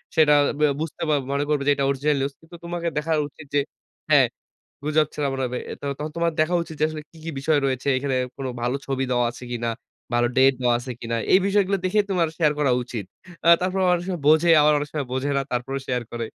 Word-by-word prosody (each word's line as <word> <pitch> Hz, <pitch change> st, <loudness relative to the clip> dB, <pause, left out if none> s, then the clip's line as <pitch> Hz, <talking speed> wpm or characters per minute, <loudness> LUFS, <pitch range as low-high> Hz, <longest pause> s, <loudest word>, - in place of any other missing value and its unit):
সেটা 155 Hz, -2 st, +5 dB, 0.3 s
ব্যা 150 Hz, -, +4 dB
বুঝতে 160 Hz, +1 st, -5 dB, 0.3 s
মনে 140 Hz, +1 st, 0 dB
করবে 150 Hz, -2 st, +1 dB
যে, -, -, +6 dB
এটা 140 Hz, -, 0 dB
অরিজিনাল 140 Hz, +2 st, +1 dB
নিউজ। 140 Hz, +1 st, -2 dB
কিন্তু 165 Hz, +2 st, -14 dB
তোমাকে 170 Hz, 0 st, -3 dB
দেখা 150 Hz, +2 st, -1 dB, 0.2 s
উচিত 150 Hz, +1 st, -14 dB
যে, 145 Hz, -, +5 dB, 0.5 s
হ্যাঁ। -, -, +6 dB, 0.6 s
গুজব 155 Hz, 0 st, +2 dB
ছাড়া 145 Hz, -2 st, -1 dB
মনে 135 Hz, 0 st, -2 dB
হবে। 125 Hz, 0 st, -4 dB, 0.4 s
তখন 150 Hz, +1 st, -4 dB
তোমার 170 Hz, -1 st, +1 dB
দেখা 165 Hz, +3 st, +2 dB
উচিত 165 Hz, -, -9 dB
যে, 155 Hz, -, +4 dB
আসলে 155 Hz, -1 st, -6 dB
কী, -, -, -19 dB
কী 165 Hz, -, -3 dB
বিষয় 155 Hz, +1 st, +2 dB
রয়েছে। 130 Hz, 0 st, -2 dB
এখানে 135 Hz, 0 st, -1 dB, 0.2 s
কোন 135 Hz, -, -5 dB, 0.2 s
ভালো 125 Hz, +3 st, 0 dB
ছবি 135 Hz, -1 st, -1 dB
দেওয়া 120 Hz, -1 st, +2 dB
আছে 125 Hz, -, -13 dB
কিনা, 120 Hz, -1 st, -2 dB, 0.4 s
ভালো 120 Hz, 0 st, +3 dB
ডেট 135 Hz, +1 st, +6 dB
দেওয়া 120 Hz, -1 st, +3 dB
আছে 125 Hz, +1 st, -7 dB
কিনা। 115 Hz, 0 st, -2 dB, 0.2 s
এই 185 Hz, -, +8 dB
বিষয়গুলো 200 Hz, -1 st, +2 dB
দেখে 205 Hz, +3 st, +3 dB
তোমার 175 Hz, -4 st, +2 dB
শেয়ার 155 Hz, -3 st, +3 dB
করা 140 Hz, -4 st, +2 dB
উচিত। 115 Hz, -5 st, -6 dB, 0.4 s
অ্যা 170 Hz, -, +7 dB
তারপর 185 Hz, +1 st, -1 dB
অনেক 175 Hz, 0 st, 0 dB
সময় 175 Hz, -5 st, -3 dB
বোঝে, 160 Hz, +2 st, +5 dB
আবার 150 Hz, +1 st, +5 dB
অনেক 145 Hz, 0 st, -4 dB
সময় 145 Hz, -4 st, -2 dB
বোঝে 130 Hz, +2 st, -1 dB
না, 140 Hz, -, +1 dB
তারপরেও 130 Hz, +3 st, -2 dB
শেয়ার 125 Hz, -1 st, -1 dB
করে। 115 Hz, -1 st, -3 dB
145 Hz, 225 wpm, -23 LUFS, 130-160 Hz, 0.6 s, এই